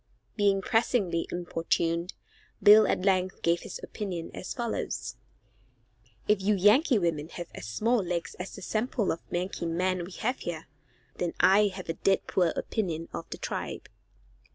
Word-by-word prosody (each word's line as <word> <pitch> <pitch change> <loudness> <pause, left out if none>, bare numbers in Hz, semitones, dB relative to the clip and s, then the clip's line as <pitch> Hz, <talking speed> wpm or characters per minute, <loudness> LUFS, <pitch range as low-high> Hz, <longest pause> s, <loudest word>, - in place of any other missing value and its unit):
Being 200 -2 +2
pressingly 215 -7 +1
importuned, 170 0 -1 0.5
Bill 215 +1 +9
at 180 - 0
length 185 -1 +1
gave 170 0 +3
his - - -7
opinion 185 - -5
as - - -6
follows: 235 -3 -3 1.1
"If 210 -2 +3
you 205 +2 +3
Yankee 220 - +5
women 165 -4 -1
have 175 -1 -7
as 100 - -8
small 220 - +1
legs 170 -1 -3
as 180 - -6
the 195 - -9
sample 220 +1 0
of 165 - -3
Yankee 175 -1 -2
men 180 +2 0
we 180 +2 -9
have 250 +7 -2
here, 165 -2 -5 0.5
then 175 -1 -2
I 205 +2 +6
have 185 -2 -7
a 165 - -1
d 195 +3 +3
d - - -13
poor 180 -2 +2
opinion 165 -6 -2
of 85 0 -6
the - - -6
tribe." - - -5
185 Hz, 160 wpm, -28 LUFS, 170-210 Hz, 1.1 s, Bill